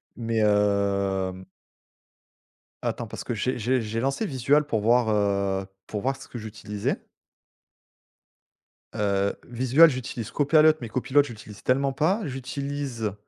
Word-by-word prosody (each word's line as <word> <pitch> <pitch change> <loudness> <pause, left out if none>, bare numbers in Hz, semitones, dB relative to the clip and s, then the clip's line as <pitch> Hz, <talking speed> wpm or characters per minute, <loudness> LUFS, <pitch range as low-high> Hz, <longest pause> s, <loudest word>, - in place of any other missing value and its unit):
mais 115 -1 -2
hem 100 -2 +1 1.4
attends, - - -2
parce - - -7
que 120 - -3
j'ai 125 +4 -1
j'ai 125 +4 +1
j'ai 115 0 -3
lancé 135 - -1
Visual, 140 - +2
pour 115 -8 -1
voir, 120 +1 +3
heu, 100 -2 +1 0.2
pour 105 - -4
voir 135 +4 0
ce 130 - -12
que 120 - -7
j'utilisais 105 -1 -4 1.9
Heu, 100 -1 0
Visual, 130 +7 +5
j'utilise 125 -4 -5
Copilot 155 +2 +5
mais 120 - -5
Copilot 130 +5 +2
je 140 - -9
l'utilise 105 -3 -11
tellement 135 +2 +2
pas, 185 +11 +1
j'utilise 135 -4 -4
115 Hz, 130 wpm, -25 LUFS, 105-135 Hz, 1.9 s, Visual